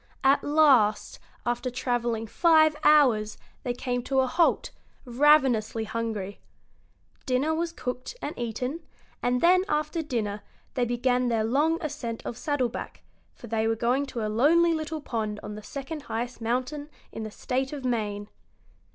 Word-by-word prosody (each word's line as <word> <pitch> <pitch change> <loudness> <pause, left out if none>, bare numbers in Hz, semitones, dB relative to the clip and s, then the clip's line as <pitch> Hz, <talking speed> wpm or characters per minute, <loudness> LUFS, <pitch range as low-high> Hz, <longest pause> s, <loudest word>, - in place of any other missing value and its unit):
At 270 +1 +4
last, 275 -9 +3 0.3
after 240 +1 -1
travelling 240 -2 -1
five 315 +5 +4
hours, 245 -9 +4 0.2
they 245 -2 -3
came 245 0 -2
to 265 -1 +2
a - - +2
halt, 330 +6 +1 0.3
ravenously 250 -4 +3
hungry. 220 -3 -4 0.9
Dinner 265 +5 +1
was 335 +1 -1
cooked 255 - -5
and 300 - -4
eaten, 250 +6 -3 0.4
and 245 0 +1
then, 365 +2 +5
after 305 +2 0
dinner, 215 -8 -3 0.3
they 250 -2 +1
began 245 +1 +1
their 225 -2 +1
long 290 +8 +2
ascent 235 -6 -5
of - - -4
Saddleback, 260 -3 -3 0.3
for - - -12
they 225 -1 0
were 225 - +1
going 245 +5 0
to 230 -4 -4
a - - -1
lonely 320 +10 +4
little 315 0 -3
pond 215 -5 -3
on 210 - -6
the 210 - -8
second 280 +7 -6
highest 240 -1 -5
mountain 255 +6 -2 0.2
in - - -6
the 215 - -4
State 260 +5 -2
of 285 -3 -6
Maine. 210 -4 -2
250 Hz, 150 wpm, -27 LUFS, 225-295 Hz, 0.9 s, then